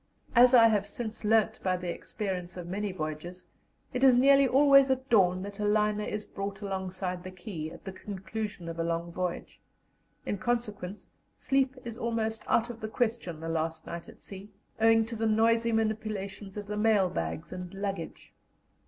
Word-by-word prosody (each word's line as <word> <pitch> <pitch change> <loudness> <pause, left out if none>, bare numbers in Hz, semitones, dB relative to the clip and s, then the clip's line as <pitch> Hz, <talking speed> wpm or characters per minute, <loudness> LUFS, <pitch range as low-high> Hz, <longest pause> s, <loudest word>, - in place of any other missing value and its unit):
As 250 +2 +7
I 230 -2 +8
have 205 -2 +1
since 220 +1 -6
learnt 220 0 +3
by 185 -1 +1
the 175 -1 -3
experience 185 -4 -5
of 175 - -6
many 200 +3 -2
voyages, 175 +1 -5 0.5
it 250 +1 -1
is 260 -2 +7
nearly 275 +2 +6
always 275 +1 +6
at 260 0 0
dawn 185 -4 +4
that 200 +1 -8
a - - -1
liner 210 0 +2
is 210 0 -4
brought 195 0 -6
alongside 185 -2 -3
the 185 - -6
quay 180 -4 -6
at - - -12
the 190 - -4
conclusion 200 -1 -6
of 165 0 -6
a - - +1
long 170 0 -2
voyage; 180 0 -4 0.6
in 205 - -2
consequence, 210 -5 -3 0.3
sleep 270 0 +1
is 230 0 -6
almost 225 -2 -1
out 235 +1 +2
of 230 - -11
the 215 - -3
question 220 -9 -1
the 165 - -6
last 160 0 -2
night 170 0 -7
at - - -15
sea, 195 +1 -10 0.3
owing 225 0 +5
to 230 +1 -6
the 225 0 0
noisy 230 +1 +3
manipulations 215 -3 -2
of 205 - -5
the 210 +1 -4
mail 210 -3 +4
bags 175 -2 -4
and 180 -1 -6
luggage. 195 -4 -5
205 Hz, 180 wpm, -29 LUFS, 185-225 Hz, 0.6 s, I